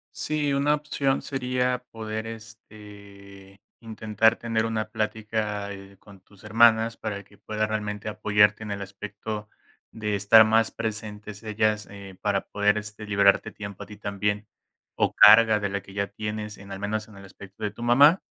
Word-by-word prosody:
Sí, 150 -2 -1
una 140 +2 +2
opción, 145 -2 -1
sería 125 -2 -1
poder, 110 0 -5
este, 100 -3 -13 0.2
intentar, 110 0 +1
tener 115 -1 -1
una 110 -1 -2
plática, 105 -1 -3
eh, 100 0 -11
con 100 -2 -16
tus 100 +2 -22
hermanas, 115 +1 +4
para 100 -2 -5
que 100 +1 -22
puedan, 110 0 -3
realmente 105 0 -3
apoyarte 105 0 +2
en 105 - -6
el 100 0 -4
aspecto, 105 +2 -7 0.4
de 105 -2 -3
estar 105 +2 +7
más 110 +1 +2
presentes 105 -1 -6
ellas, 110 -1 0
eh, 100 -2 -11
para 100 -1 +1
poder 105 +1 +1
este 105 0 -8
liberarte 100 +1 +3
tiempo 100 -1 -8
a - - -11
ti 105 0 -12
también, 105 +1 -2 0.5
o - - +1
carga 110 0 +7
de 100 -1 -2
la 100 0 -3
que 95 0 -15
ya 100 0 -1
tienes, 105 0 -6
en 100 0 -12
al 95 - -6
menos 105 +1 -3
en 110 - -16
el 100 - -12
aspecto 100 +2 -13
de 105 - -1
tu 110 +3 -9
mamá. 140 +9 +6
105 Hz, 170 wpm, -25 LUFS, 100-110 Hz, 0.5 s, estar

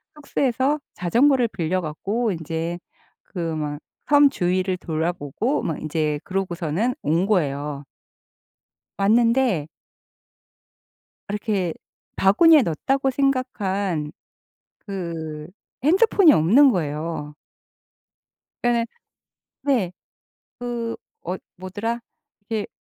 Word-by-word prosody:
숙소에서 280 -1 0
자전거를 240 +6 +3
빌려 185 -1 -1
갖고 200 +9 -2
인제 165 +1 -3 0.4
그 180 - -9 0.2
막 150 -1 -3 0.3
섬 290 -1 +6
주위를 185 -2 0
돌아보고 170 - -2
막 160 - -3
인제 155 -1 -1
그러고서는 185 +3 -1
온 165 +5 +1
거예요. 145 -7 -1 1.1
왔는데 230 - +3 1.6
이렇게 200 -5 -1 0.4
'바구니에 300 - +6
넣었다.' 225 - 0
고 270 0 0
생각한 205 - -1 0.8
그 165 -6 -5 0.4
핸드폰이 375 +1 +6
없는 250 - +6
거예요. 155 - -3 1.3
그러니까 240 -1 +2 0.8
네 240 -11 +1 0.7
그 235 -1 -3 0.3
어 180 +2 -2 0.2
뭐더라? 205 +6 -3 0.5
이렇게 215 -2 -1
190 Hz, 200 characters per minute, -23 LUFS, 160-245 Hz, 1.6 s, 섬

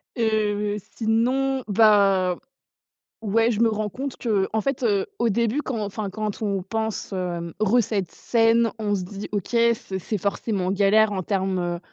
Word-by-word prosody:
Heu, 210 -2 0 0.2
sinon, 255 +4 +1
bah, 200 -4 +4 0.8
ouais 225 +2 +2
je 220 - -2
me 230 - +5
rends 215 -1 -2
compte 270 +5 -5
que, 205 -5 0
en 220 - +1
fait, 275 0 -2
heu, 200 -4 +2
au 235 - +2
début 235 +6 +1
quand 255 -6 -4
enfin 205 0 -4
quand 215 +1 -4
on 200 -3 -1
pense, 220 +1 -3
heu, 175 -3 -3
recette 215 -3 +1
saine, 230 0 +2
on 205 -2 0
se 185 - -3
dit: 195 +3 -7
«OK, 200 -3 -2
c'est 230 -5 +1
c'est 210 +4 -3
forcément 200 -1 -1
galère 205 +2 +4
en 190 -2 -2
termes, 190 -1 -1
heu, 175 -1 -2
210 Hz, 165 wpm, -24 LUFS, 195-230 Hz, 0.8 s, me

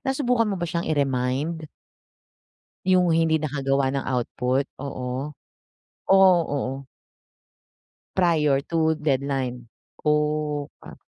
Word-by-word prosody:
nasubukan 250 -4 +1
mo 195 - -1
ba 175 - -2
siyang 170 0 -3
i-remind? 145 +2 -1 1.2
Yung 180 -2 +4
hindi 160 -1 +3
nakagawa 140 -3 0
ng 140 - -2
output, 125 +1 0 0.2
oo. 135 +1 -5 0.7
Oh 190 -1 +6 0.2
oo. 135 -1 -3 1.3
Prior 160 -6 +3
to 160 -1 +1
deadline? 135 -4 -2 0.3
Oh, 150 -1 0 0.2
ah - - -12
150 Hz, 95 wpm, -24 LUFS, 135-165 Hz, 1.3 s, Oh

